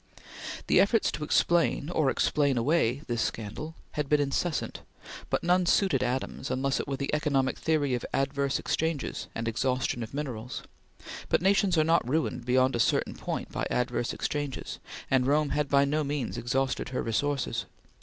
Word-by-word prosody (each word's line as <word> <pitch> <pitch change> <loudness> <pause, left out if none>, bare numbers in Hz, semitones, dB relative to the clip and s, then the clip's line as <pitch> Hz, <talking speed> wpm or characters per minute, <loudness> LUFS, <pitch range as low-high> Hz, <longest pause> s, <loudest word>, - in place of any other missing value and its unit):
The - - +4
efforts 220 +2 +3
to - - -4
explain, 170 0 +2
or 155 -6 +2
explain 140 -1 +2
away, 135 0 +2
this 120 -1 -1
scandal 115 +9 -4 0.2
had 150 -2 -3
been 150 - +4
incessant, 145 +3 -1 0.5
but - - 0
none 180 +1 +3
suited 175 -11 +3
Adams 130 +1 -2
unless 135 +1 0
it - - -3
were 135 -1 -2
the 140 +1 -3
economic 140 -3 +1
theory 150 -4 +1
of 125 - -1
adverse 140 0 0
exchanges 160 -3 -2
and 115 0 -3
exhaustion 125 +1 0
of 110 - -5
minerals; 125 -5 -4 0.7
but - - +2
nations 195 -2 +3
are 155 - +5
not 165 -6 +2
ruined 150 -4 -1
beyond 130 +1 +3
a - - -1
certain - - +2
point - - -4
by - - -2
adverse 125 -1 0
exchanges, 145 -2 -3 0.3
and 130 -1 +3
Rome 150 +1 +3
had 150 -1 0
by 140 0 +5
no 150 +2 0
means 140 -4 -2
exhausted 130 +2 -1
her 125 - -2
resources. 120 0 -1
140 Hz, 165 wpm, -28 LUFS, 125-150 Hz, 0.7 s, are